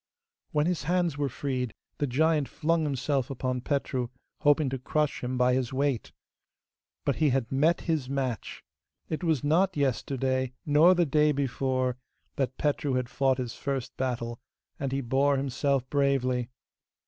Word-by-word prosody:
When 150 0 +2
his 170 -6 -1
hands 175 -1 +1
were 145 -1 -1
freed, 125 -4 -3 0.2
the 145 - +1
giant 150 +2 +2
flung 165 0 +1
himself 135 -1 0
upon 130 -1 -2
Petru, 130 -2 -1 0.3
hoping 145 0 +4
to 135 - -3
crush 150 +3 -1
him 125 +1 -2
by 125 0 +4
his 130 -2 0
weight. 135 -3 -1 0.9
But 140 - +1
he 155 -2 +3
had 130 -3 0
met 150 +6 +3
his 155 -6 -1
match. 130 -4 -3 0.5
It 160 +3 -3
was 160 -6 +1
not 175 +4 +2
yesterday, 130 -1 0
nor 155 +5 +6
the 175 -1 +3
day 150 +1 +3
before, 130 -2 0 0.4
that 130 -1 -1
Petru 145 -2 0
had 125 -1 -1
fought 135 -1 +2
his 125 -3 -3
first 135 -3 -3
battle, 120 -2 -2 0.4
and 135 -2 -2
he 135 +1 0
bore 135 +3 +2
himself 135 0 0
bravely. 130 -4 +1
135 Hz, 155 wpm, -28 LUFS, 130-150 Hz, 0.9 s, nor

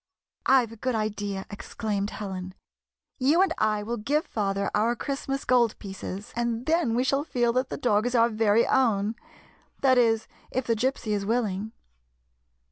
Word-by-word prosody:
" - - -67
I 260 -2 +6
've 225 - -14
a - - -9
good 255 +2 -1
idea," 205 -2 -2
exclaimed 205 0 -3
Helen. 185 -3 -6 0.3
" - - -53
You 340 +5 +5
and 370 -4 +1
I 215 -1 +1
will 235 +3 -3
give 285 +8 0
father 200 -2 -1
our 225 +3 +2
Christmas 275 +1 -3
gold 240 -3 +3
pieces, 195 0 -7
and 235 0 -1
then 315 -7 +2
we 250 - +2
shall 275 +2 +1
feel 240 -5 0
that 255 +1 0
the - - -4
dog 220 -4 +2
is 245 - -1
our 230 0 +5
very 220 0 +3
own 220 -4 +2 0.3
— - - -33
that 260 -2 +5
is, 225 -2 +2 0.2
if 260 -1 -2
the 230 - +1
Gypsy 245 -1 -1
is 205 -1 0
willing." 215 -2 -1
230 Hz, 185 wpm, -26 LUFS, 210-255 Hz, 0.3 s, I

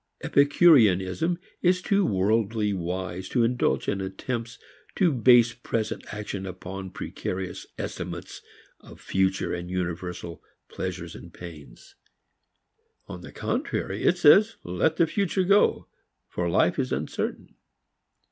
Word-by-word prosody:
Epicureanism 140 - +4 0.2
is 180 0 +3
too 200 +2 +1
worldly 105 - +1
wise 90 0 -4
to 120 - +2
indulge 120 +2 +1
in 100 - -1
attempts 115 +5 -4 0.4
to 180 -4 +3
base 120 -2 +5
present 115 -2 -3
action 100 -2 -5
upon 95 +1 -7
precarious 95 +1 -5
estimates - - -6 0.4
of - - -15
future 95 0 0
and 90 0 -5
universal 90 -2 -4 0.3
pleasures - - -5
and - - -12
pains. 75 -8 -12 1.1
On 90 - -8
the - - -10
contrary 95 +2 -3
it 180 - +3
says 200 +7 +6
let 90 - 0
the 170 - +5
future 190 +2 0
go, 200 +3 +3 0.4
for 90 -1 -2
life - - +2
is - - -1
uncertain. - - -3
100 Hz, 120 wpm, -26 LUFS, 90-140 Hz, 1.1 s, says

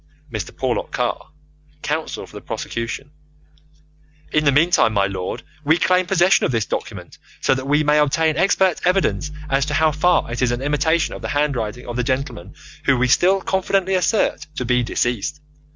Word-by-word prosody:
Mr. - - -3
Porlock - - -2
Carr - - -2 0.5
(counsel - - -3
for - - -17
the - - -7
prosecution): 115 +5 -5 1.2
In 155 0 +2
the 140 - +5
meantime, 145 -6 +3
my 100 -1 +2
lord, 95 -2 -4 0.2
we 155 +3 +3
claim 180 +1 +2
possession 175 +2 +3
of - - +1
this 115 -3 0
document, - - -6 0.2
so - - +2
that 130 0 -4
we 150 +2 +3
may 150 0 +3
obtain 155 +2 +2
expert 190 +1 +2
evidence 180 -4 +1 0.2
as 135 0 +1
to 150 - -1
how 155 +1 +3
far 155 -2 +1
it 120 - -3
is 125 -1 +2
an 120 +2 -3
imitation 150 +3 +1
of - - -8
the - - -4
handwriting 125 -6 -1
of 120 0 -5
the 125 - 0
gentleman 130 - -3 0.3
whom 140 -2 +3
we 125 - +2
still 185 +9 +3
confidently 190 0 0
assert 185 +4 +1
to 125 - -3
be 125 +1 +2
deceased. 120 +2 -2
145 Hz, 180 wpm, -20 LUFS, 125-170 Hz, 1.2 s, the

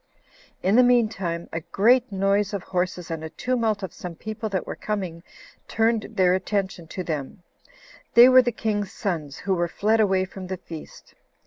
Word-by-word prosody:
In 195 +3 +3
the - - +8
mean 245 -3 +4
time, 170 -5 -4
a 165 - -1
great 235 +8 +3
noise 195 +1 +1
of 195 - -4
horses, 180 -1 -2
and 160 -1 -4
a 160 - -5
tumult 225 +1 -1
of 190 - -5
some 175 -2 -7
people 220 +5 -5
that 190 -2 -2
were - - -5
coming, 185 -6 -4 0.5
turned 225 -1 +1
their 180 -1 +4
attention 190 -3 -2
to 185 +3 -5
them; 155 +2 -5 0.7
they 240 +1 +10
were 255 0 +8
the 245 -1 -1
king's 210 -3 -2
sons, 160 - -3
who 195 - -1
were 175 -1 0
fled 215 +6 +1
away 190 -3 +3
from 185 0 -9
the 190 0 -4
feast. 165 -3 -11
195 Hz, 185 wpm, -24 LUFS, 175-220 Hz, 0.7 s, they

